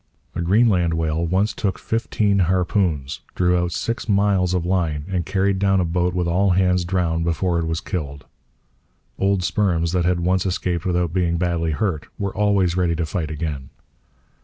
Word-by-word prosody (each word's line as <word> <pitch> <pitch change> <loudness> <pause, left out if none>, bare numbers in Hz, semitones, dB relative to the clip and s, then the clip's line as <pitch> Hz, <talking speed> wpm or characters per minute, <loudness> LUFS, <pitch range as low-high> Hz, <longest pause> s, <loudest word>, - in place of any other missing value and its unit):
A - - -3
Greenland 90 -3 +3
whale 80 0 -1
once 95 +5 +1
took 100 -4 -2
fifteen 105 -3 0
harpoons, 90 -5 0 0.2
drew 90 0 +2
out 90 0 0
six 115 +5 -3
miles 100 -3 +2
of 90 -2 -1
line, 85 -5 -1
and 90 -3 -2
carried 95 0 +1
down 95 -1 +3
a 90 - +1
boat 90 +1 0
with 90 -1 0
all 95 +4 +2
hands 90 -1 +2
drowned 85 -2 0
before 85 +1 0
it 80 - -2
was 80 +2 -2
killed. 70 -9 -5 0.9
Old 95 -1 +1
sperms 85 -4 +1
that 90 -1 +1
had 90 0 +1
once 90 +1 +1
escaped 90 -2 -2
without 90 -2 0
being 85 -2 +1
badly 85 -1 0
hurt 80 0 -2
were 100 -1 -3
always 100 -4 +2
ready 90 -2 +1
to 80 0 -1
fight 80 -1 -3
again. 75 -4 -4
90 Hz, 175 wpm, -21 LUFS, 85-95 Hz, 0.9 s, Greenland